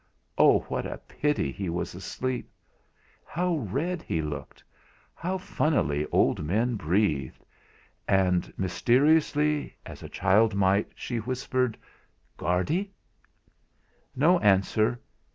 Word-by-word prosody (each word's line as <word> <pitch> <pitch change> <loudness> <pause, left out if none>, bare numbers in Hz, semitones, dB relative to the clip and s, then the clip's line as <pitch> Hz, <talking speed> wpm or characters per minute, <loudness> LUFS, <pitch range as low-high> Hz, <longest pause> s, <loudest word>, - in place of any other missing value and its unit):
Oh! - - +5
what - - -4
a - - -6
pity 145 - -1
he 95 +4 -4
was 85 +1 -3
asleep! 125 +7 -4 0.7
How 175 0 -1
red 150 - -2
he 80 - -2
looked! 75 -2 -7 0.5
How 185 +3 -3
funnily 75 - 0
old - - +2
men 110 +10 0
breathed! 85 - -1 0.6
And 90 -2 +2
mysteriously, 145 - +2
as - - -10
a - - -8
child 100 +3 +3
might, 100 +1 +2
she 120 - -4
whispered: 125 0 -1 0.6
"Guardy!" 155 - -1 1.2
No 170 +7 +4
answer! 110 - +2
110 Hz, 105 wpm, -27 LUFS, 95-150 Hz, 1.2 s, Oh